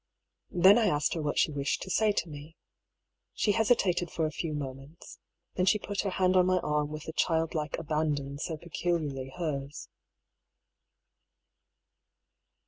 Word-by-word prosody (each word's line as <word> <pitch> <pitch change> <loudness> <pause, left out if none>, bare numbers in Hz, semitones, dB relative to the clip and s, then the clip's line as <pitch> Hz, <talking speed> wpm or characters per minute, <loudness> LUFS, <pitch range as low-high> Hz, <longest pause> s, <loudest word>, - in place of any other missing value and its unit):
Then 190 +5 +6
I 220 - +3
asked 150 -5 +1
her 165 - -3
what 150 -1 -2
she - - +3
wished 140 -1 -1
to 190 - -6
say 215 +1 +3
to 190 -4 -1
me. 150 +1 -10 0.8
She 210 - +2
hesitated 200 -6 +2
for 160 - -1
a 155 - -2
few 155 -1 -4
moments. 135 +2 -8 0.3
Then 180 0 0
she 210 - +5
put 205 0 -3
her 200 - -2
hand 185 0 +1
on 180 -1 +5
my 185 0 +3
arm 150 0 0
with 155 0 -6
the 160 - -7
childlike 160 -3 0
abandon 145 -3 -2
so 160 0 -3
pecul 170 +2 -1
iarly 135 -1 -6
hers. 145 -4 -4
160 Hz, 155 wpm, -29 LUFS, 150-185 Hz, 0.8 s, Then